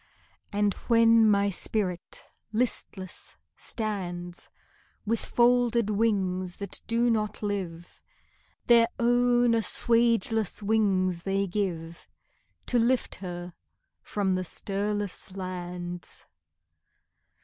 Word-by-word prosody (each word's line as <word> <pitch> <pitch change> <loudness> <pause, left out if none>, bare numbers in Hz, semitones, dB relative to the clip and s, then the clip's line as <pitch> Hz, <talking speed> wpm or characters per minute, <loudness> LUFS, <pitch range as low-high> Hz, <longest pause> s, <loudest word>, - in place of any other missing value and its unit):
And 205 -1 +1
when 230 -1 +6
my 200 -1 +3
spirit 185 -2 -3 0.3
listless 215 -5 -3 0.2
stands, 180 -6 -4 0.6
With 225 +1 0
folded 240 -2 +3
wings 190 -4 0
that 200 -2 -5
do 235 +1 +2
not 215 -1 -1
live, 180 -5 -4 0.6
Their 235 -1 +6
own 245 0 +3
assuageless 230 -2 +2
wings 190 -5 +2
they 195 +2 0
give 175 -4 -4 0.6
To 245 - +2
lift 245 +2 +1
her 175 -1 -6 0.5
from 195 -2 -1
the 185 0 0
stirless 200 +1 -3
lands. 180 -1 -6
205 Hz, 90 wpm, -27 LUFS, 185-230 Hz, 0.6 s, when